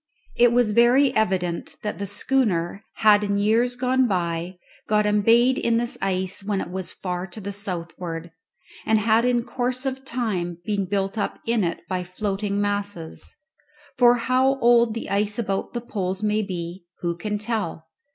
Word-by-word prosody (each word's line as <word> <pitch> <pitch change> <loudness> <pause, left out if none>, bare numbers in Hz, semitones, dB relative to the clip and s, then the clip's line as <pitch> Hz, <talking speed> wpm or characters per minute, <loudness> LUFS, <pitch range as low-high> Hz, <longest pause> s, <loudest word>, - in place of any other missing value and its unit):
It 240 -1 +5
was 240 -3 +3
very 245 +5 +4
evident 180 -5 0
that 210 -2 -3
the 200 - -3
schooner 200 -5 0
had 210 -1 +5
in 200 -1 0
years 225 +4 +2
gone 255 0 +2
by 175 -2 -2 0.3
got 210 0 +3
embayed 230 +5 +4
in 230 -1 +2
this 240 0 -1
ice 190 0 -1
when 200 -1 -1
it 175 - -5
was 185 -1 -3
far 180 0 -4
to 190 +4 -9
the 200 0 -5
southward, 170 -3 -5 0.5
and 220 - +3
had 220 +2 +3
in 245 -1 +2
course 255 +1 -2
of 265 0 -3
time 210 -10 -2
been 205 -2 0
built 195 +2 -1
up - - -2
in 230 -2 +1
it 170 -1 -2
by 185 -1 -2
floating 200 +2 -2
masses. 205 -5 -3 0.6
For 245 -1 +6
how 255 +3 +2
old 235 -1 +4
the 230 - -4
ice 205 +1 0
about 195 -4 -2
the 240 - -3
poles 190 -4 -3
may 210 0 +2
be 175 -2 -5 0.2
who 170 -1 -1
can 210 +4 -3
tell? 210 -7 -3
205 Hz, 170 wpm, -24 LUFS, 185-235 Hz, 0.6 s, For